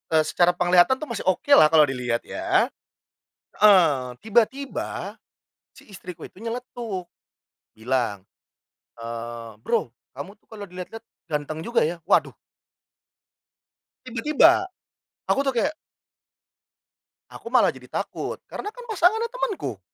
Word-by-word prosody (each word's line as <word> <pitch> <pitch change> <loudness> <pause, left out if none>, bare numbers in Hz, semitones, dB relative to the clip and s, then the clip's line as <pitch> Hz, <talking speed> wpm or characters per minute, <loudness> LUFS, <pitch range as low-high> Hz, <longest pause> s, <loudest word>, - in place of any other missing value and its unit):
eee, 155 - +5
secara 175 +3 +2
penglihatan 180 +7 +4
tuh 305 +3 -7
masih 210 -5 -5
oke 235 +10 0
lah 155 - +9
kalau 155 -1 +6
dilihat 125 -4 -1
ya. 365 +3 0 0.9
Heeh, 155 -12 +5
tiba-tiba 240 +5 -1 0.6
si - - -18
istriku 180 -3 -9
itu - - -37
nyeletuk 230 -5 -5 0.7
bilang, 110 -4 -1 0.7
eee, 115 0 -6
"Bro, 120 -1 -1 0.2
kamu 145 +10 -9
tuh 215 - -41
kalau 205 -2 -8
dilihat-lihat 185 +5 -9 0.3
ganteng 150 +2 -3
juga 235 -8 +2
ya," 170 0 -6
waduh. - - +2 1.7
Tiba-tiba, 305 +9 +3 0.6
aku 275 - +3
tuh 270 - +1
kayak 290 +6 +1 1.6
Aku - - -11
malah - - +4
jadi - - -14
takut - - -4
karena - - -6
kan - - -11
pasangannya 440 +3 +2
temenku. 355 - -3
185 Hz, 115 wpm, -24 LUFS, -, 1.7 s, lah